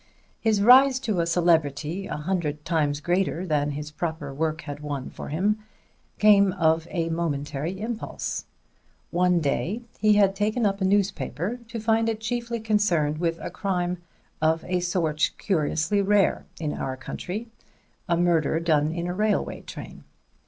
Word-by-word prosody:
His 215 -3 +2
rise 260 +3 +7
to 215 -8 -1
a 170 - +1
celebrity 165 +1 +1
a - - -4
hundred 150 -2 -2
times 150 -4 0
greater 180 +1 0
than 150 -4 +1
his 150 +1 -5
proper 160 -3 -4
work 160 +3 -1
had 145 -1 -7
won 145 -3 -5
for - - -8
him 200 +8 +1 0.6
came 200 -2 +5
of 165 -2 +2
a 165 -2 -1
momentary 160 +1 -2
impulse. 225 +1 -4 0.7
One 180 0 +3
day 180 +10 -1 0.2
he 215 0 +5
had 200 -2 +4
taken 215 +3 0
up 200 0 0
a - - +2
newspaper 190 - 0
to 230 0 -5
find 225 +1 +2
it 220 -1 -2
chiefly 235 +1 -3
concerned 185 -9 +1
with 165 -1 0
a - - -5
crime 180 -3 -1 0.4
of 160 +1 +2
a 180 0 0
sort 170 -4 +1
curiously 170 +2 +1
rare 200 -1 +2
in 155 -2 -2
our 130 -1 -4
country: 210 - -6 0.6
a 170 - +3
murder 165 -3 +2
done 155 -2 +2
in 170 +1 -3
a 175 - -2
railway 210 +2 0
train. - - -9
175 Hz, 155 wpm, -25 LUFS, 155-205 Hz, 0.7 s, rise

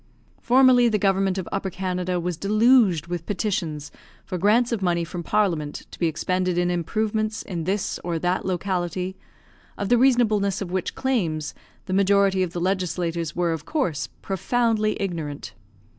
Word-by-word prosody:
Formerly 250 -1 +5
the 215 - +1
government 195 -1 +1
of 185 - -4
Upper 190 - -2
Canada 180 -1 -2
was 175 0 -2
deluged 210 - +3
with 170 -1 -5
petitions 170 -7 -2 0.3
for 180 -2 -4
grants 225 +6 +3
of 230 -4 -1
money 175 -2 +1
from 170 +1 -5
Parliament 170 -6 -1
to - - -12
be 170 - +2
expended 180 +3 -1
in 175 0 +1
improvements 215 +5 -1
in 170 -5 -5
this 195 +2 -1
or 170 -1 -2
that 180 +3 0
locality, 185 0 -2 0.6
of 200 - -3
the 245 -1 +4
reasonableness 220 -6 +3
of 185 -3 -5
which 185 -1 -2
claims 170 - -1 0.3
the 185 - -4
majority 195 0 +3
of 180 -2 -1
the 175 - -4
legislators 175 -3 -1
were, 175 -1 +1
of 155 -2 -6
course, 260 - -1 0.2
profoundly 215 +2 0
ignorant. 165 -7 -4
185 Hz, 160 wpm, -24 LUFS, 175-210 Hz, 0.6 s, Formerly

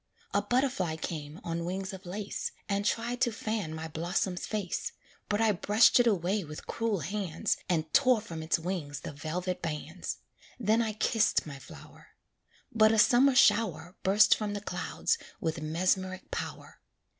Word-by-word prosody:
A 205 - +3
butterfly 205 - 0
came 155 -1 -6
on 170 0 -3
wings 190 +2 -3
of 190 -1 -9
lace, 200 +3 -4
And 200 0 0
tried 235 +3 -1
to 245 -2 +3
fan 215 -5 -3
my 160 0 -5
blossom's 175 +3 -2
face; 205 -5 -3 0.4
But 205 +1 +1
I 220 -1 +4
brushed 210 +6 +5
it 240 - +4
away 195 0 +1
with 150 -1 -9
cruel 225 -6 -1
hands, 180 0 -1
And 160 -3 0
tore 255 -4 +5
from 170 -7 -7
its 160 +2 +1
wings 165 -5 -4
the - - -6
velvet 175 +5 -3
bands; 165 +2 -4 0.4
Then 220 0 +3
I 220 -2 -1
kissed 215 +1 +2
my 140 -3 -8
flower; - - -14 0.6
But 215 -1 +5
a 225 - +2
summer 245 +5 +5
shower 180 - +3
Burst 195 +3 +6
from 210 -1 -3
the 205 - -4
clouds 460 - -1 0.2
with 160 -1 -2
mesmeric 185 +4 -1
power. - - -6
190 Hz, 160 wpm, -30 LUFS, 165-215 Hz, 0.6 s, Burst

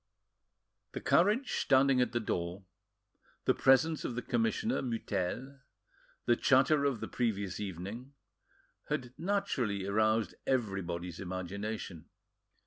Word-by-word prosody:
The - - -3
carriage 210 +9 +3
standing 135 -1 +4
at 125 - +1
the 120 - 0
door, 90 -3 -3 0.8
the - - +4
presence 135 +4 +4
of 120 - -3
the 125 - -3
commissioner 120 - 0
Mutel, 120 +2 -3 0.7
the 120 - +4
chatter 135 +4 +4
of 135 -5 0
the - - -3
previous 100 -6 -1
evening, 105 - -6 0.8
had 125 -1 -2
naturally 130 - -1
roused 110 +2 +2
everybody's 90 -8 -2
imagination. 95 -1 -5
115 Hz, 110 wpm, -32 LUFS, 95-135 Hz, 0.8 s, standing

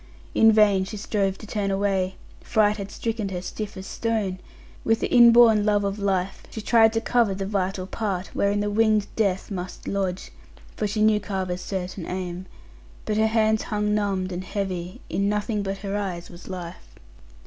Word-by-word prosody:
In 225 0 +6
vain 210 -3 +4
she 205 +3 -6
strove 195 -2 -1
to - - -11
turn 205 -2 -2
away; 195 -1 0 0.3
fright 210 -2 +2
had 200 -1 -6
stricken 220 -2 -3
her 180 -2 -3
stiff 205 +2 -6
as 190 - -7
stone. 215 -5 -2 0.4
With 225 0 +2
the - - -2
inborn 235 -3 +7
love 205 -1 +2
of 200 +1 -2
life, 195 -2 -1
she - - -7
tried 225 0 +4
to 225 - 0
cover 230 -4 +2
the 195 0 -3
vital 190 -2 -1
part 195 -2 -3
wherein 200 +1 +1
the 205 0 -1
winged 215 -1 +3
death 195 -2 0
must 180 -1 -6
lodge 190 -2 -2 0.4
for 210 - -1
she 210 +1 0
knew 215 -1 +4
Carver's 190 -3 -3
certain 185 -2 -5
aim 185 0 -5 0.6
but 215 - -1
her 220 0 +4
hands 220 -1 +2
hung 210 0 -1
numbed, 195 -3 0
and 180 +1 -4
heavy; 185 -2 -4
in 200 +1 0
nothing 210 +1 -1
but 195 0 -3
her 200 0 -2
eyes 185 -4 -4
was 175 0 -13
life. 180 -2 -8
200 Hz, 180 wpm, -24 LUFS, 190-215 Hz, 0.6 s, inborn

